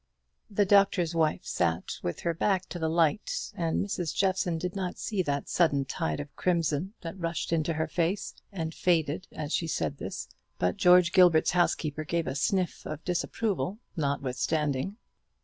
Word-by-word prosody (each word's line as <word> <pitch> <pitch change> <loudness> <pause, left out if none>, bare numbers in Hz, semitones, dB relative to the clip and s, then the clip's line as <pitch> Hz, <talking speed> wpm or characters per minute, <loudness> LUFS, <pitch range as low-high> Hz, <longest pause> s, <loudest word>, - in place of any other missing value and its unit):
The 205 0 +2
Doctor's 195 -4 +4
Wife 160 -2 +1
sat 85 0 -1
with 85 - -3
her 170 - 0
back 185 +2 +1
to 175 - -5
the 160 -1 0
light; 170 - +1
and 165 +2 0
Mrs. 175 -5 -3
Jeffson 185 -3 +1
did 180 +3 -4
not 185 -2 -3
see 205 -4 -1
that 140 -5 -2
sudden 145 -6 +2
tide 80 - -2
of 145 - -7
crimson 170 +2 0
that 170 +3 -7
rushed 170 0 -2
into 165 0 +1
her 160 0 0
face, 170 +5 -1 0.2
and 165 -4 -4
faded, 160 -2 +1
as 150 0 -5
she 165 - 0
said 75 - -1
this; - - -5 0.3
but 90 0 0
George 180 -1 +6
Gilbert's 180 -4 +6
housekeeper 155 -4 +1
gave 165 +1 -1
a 130 - -2
sniff 180 +6 0
of 155 0 -6
disapproval 195 +2 -1 0.2
notwithstanding. 145 - -1
165 Hz, 165 wpm, -29 LUFS, 150-185 Hz, 0.3 s, George